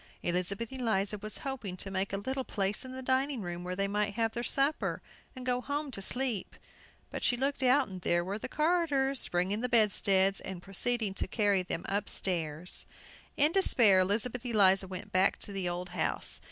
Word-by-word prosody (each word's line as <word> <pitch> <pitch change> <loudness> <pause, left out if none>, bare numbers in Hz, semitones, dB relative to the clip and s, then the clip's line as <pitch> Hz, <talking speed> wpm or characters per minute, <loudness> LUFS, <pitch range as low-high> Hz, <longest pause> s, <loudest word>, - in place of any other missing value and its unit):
Elizabeth 195 +7 -2
Eliza 210 -5 0
was 215 +1 -5
hoping 235 -9 -4
to 195 - -5
make 195 +1 -1
a 195 - -1
little 260 +6 -3
place 200 -1 -1
in 260 - -8
the 260 0 -7
dining 265 +1 0
room, 175 0 -5
where 180 +1 -4
they 195 +1 0
might 205 0 -1
have 225 -1 0
their 235 - -3
supper, 275 +4 0 0.4
and 255 -1 -8
go 250 0 +1
home 290 +1 -3
to 200 - -5
sleep. 245 -1 -1 0.6
But - - -5
she 245 - +3
looked 275 +2 -1
out, 260 +1 +4
and 185 -2 -8
there 175 0 +1
were 200 +3 -3
the - - -5
carters 300 -5 +1
bringing 185 +5 0
the 250 - -1
bedsteads, 195 -4 +4
and 190 -2 -6
proceeding 205 +3 -1
to - - -3
carry 205 -4 +2
them 180 -1 -4
upstairs. 180 -4 -1 0.5
In 295 +2 +5
despair 235 - +5
Elizabeth 220 +6 0
Eliza 195 -5 +4
went 185 0 -7
back 185 +1 +3
to - - -5
the 190 -3 -2
old 175 +1 -4
house. 175 -2 0
205 Hz, 190 wpm, -31 LUFS, 190-255 Hz, 0.6 s, In